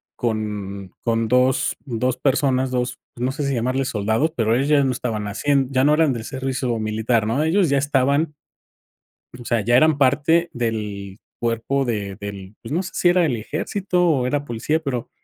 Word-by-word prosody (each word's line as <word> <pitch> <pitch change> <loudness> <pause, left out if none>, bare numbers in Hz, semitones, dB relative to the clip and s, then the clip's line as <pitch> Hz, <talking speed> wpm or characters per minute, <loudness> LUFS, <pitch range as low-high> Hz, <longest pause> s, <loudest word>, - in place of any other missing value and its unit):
con 105 -4 -3
con 115 -1 +1
dos 125 +2 +2
dos 125 -1 -1
personas, 130 -2 +1
2, 125 -1 -1 0.2
no 125 +2 -1
sé 145 0 -3
si 140 - 0
llamarle 130 +2 0
soldados, 110 +7 0
pero 115 0 +2
ellos 135 +3 0
ya 145 -2 +4
no 130 - +1
estaban 110 -4 -3
haciendo 135 +6 +1
ya 130 -1 +2
no 150 +2 +5
eran 155 -3 +3
del 115 -2 -5
servicio 130 -1 -2
militar, 110 +1 0
¿no? 135 +7 +1
Ellos 175 +2 +3
ya 140 - +3
estaban, 140 +2 +1 1.0
o 120 - -10
sea, 115 -2 0
ya 120 +3 +3
eran 155 +2 +4
parte 150 +5 +3
del 105 -4 -4 0.2
cuerpo 120 +4 0
de 105 -5 -3
del, 100 -1 -7
pues, 115 - -9
no 170 +4 +1
sé - - -7
si 175 - +3
era 175 -1 +4
el 125 -6 0
ejército 180 - -1
o 135 -6 +2
era 145 +1 -1
policía 135 +5 -1
pero, 130 -6 -4
125 Hz, 185 wpm, -22 LUFS, 110-145 Hz, 1.0 s, no